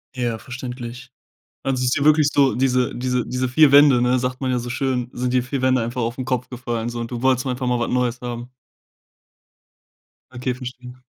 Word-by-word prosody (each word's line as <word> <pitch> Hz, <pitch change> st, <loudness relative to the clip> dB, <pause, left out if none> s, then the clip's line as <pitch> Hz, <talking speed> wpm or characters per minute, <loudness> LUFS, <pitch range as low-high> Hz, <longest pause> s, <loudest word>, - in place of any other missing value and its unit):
Ja, 120 Hz, -3 st, -2 dB
verständlich. 125 Hz, 0 st, -8 dB, 0.5 s
Also 130 Hz, -1 st, -1 dB
ist 125 Hz, -, +1 dB
dir 140 Hz, -, 0 dB
wirklich 150 Hz, -1 st, +5 dB
so 140 Hz, -2 st, +3 dB
diese 125 Hz, -1 st, +1 dB
diese 125 Hz, 0 st, -1 dB
diese 125 Hz, 0 st, -1 dB
4 140 Hz, +3 st, +5 dB
Wände, 140 Hz, -3 st, +7 dB
ne? 125 Hz, +1 st, +3 dB
Sagt 125 Hz, +1 st, -3 dB
man 130 Hz, -, 0 dB
ja 125 Hz, -, +1 dB
so 120 Hz, 0 st, -5 dB
schön, 125 Hz, -1 st, -1 dB
sind 125 Hz, 0 st, -2 dB
die 125 Hz, -, +3 dB
4 130 Hz, +1 st, -4 dB
Wände 130 Hz, -1 st, +3 dB
einfach 120 Hz, +2 st, -3 dB
aufn 120 Hz, +3 st, -3 dB
Kopf 125 Hz, -2 st, -2 dB
gefallen 120 Hz, -2 st, -3 dB
so 120 Hz, 0 st, -5 dB
und 115 Hz, -, -5 dB
du 120 Hz, -1 st, -5 dB
wolltest 130 Hz, 0 st, +2 dB
mal 130 Hz, -, 0 dB
einfach 125 Hz, +1 st, -4 dB
mal 125 Hz, -1 st, +1 dB
was 120 Hz, -, -1 dB
Neues 125 Hz, -1 st, 0 dB
haben. 120 Hz, 0 st, -6 dB, 1.8 s
Okay 125 Hz, 0 st, -3 dB
verstehe. 125 Hz, 0 st, -9 dB
125 Hz, 205 wpm, -21 LUFS, 120-130 Hz, 1.8 s, Wände